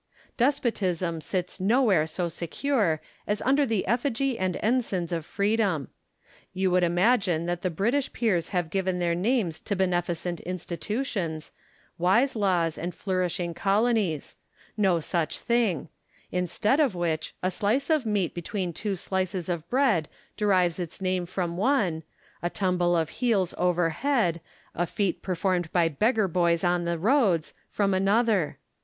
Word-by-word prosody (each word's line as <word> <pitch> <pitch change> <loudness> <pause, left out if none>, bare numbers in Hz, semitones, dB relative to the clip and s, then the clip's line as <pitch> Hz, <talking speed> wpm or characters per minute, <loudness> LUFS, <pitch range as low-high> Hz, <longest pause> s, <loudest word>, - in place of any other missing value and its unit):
Despotism 185 - 0
sits 180 +2 -3
nowhere 200 -5 +3
so 175 +2 -2
secure 170 - -1 0.3
as 210 +1 0
under 275 +2 +3
the 220 -4 0
effigy 250 +4 0
and 185 -4 -1
ensigns 210 -7 0
of 165 -2 -2
Preedom. 200 - 0 0.7
You 190 0 +1
would 180 0 +4
imagine 175 -1 +2
that 175 0 -2
the 185 - 0
British 235 - 0
peers 190 -9 0
have 175 -4 -1
given 190 -1 0
their 175 -1 +1
names 185 -3 0
to 205 - -3
beneficent 175 -2 -1
institutions, 180 - -4 0.5
wise 235 +11 +3
laws, 180 -6 +1
and 175 +2 -4
flourishing 180 -2 -1
colonies: 200 - 0 0.4
no 190 -5 +3
such 165 0 -1
thing; 230 -10 0 0.4
instead 180 - +1
of 275 -11 +2
which, 160 -3 -2
a 185 - +1
slice 230 - 0
of 310 -4 +3
meat 205 -6 0
between 180 +1 -3
two 200 +4 -2
slices 185 -1 -2
of 170 -1 -3
bread 240 - +2 0.3
derives 185 -5 +2
its 170 -3 -5
name 185 -2 -1
from 175 -2 -3
one; 195 - +1 0.4
a 175 - -1
tumble 180 -2 +1
of 160 -2 0
heels 210 -8 +2
over 175 -2 +1
head, 195 - 0 0.3
a 175 - -1
feat 195 -2 -1
performed 180 -2 -1
by 175 -2 +3
beggar 215 - +2
boys 170 -1 +1
on 175 -1 +1
the 170 0 -1
roads, 195 - +2 0.2
from 200 -2 +1
another. 200 -2 +2
185 Hz, 145 wpm, -27 LUFS, 170-215 Hz, 0.7 s, would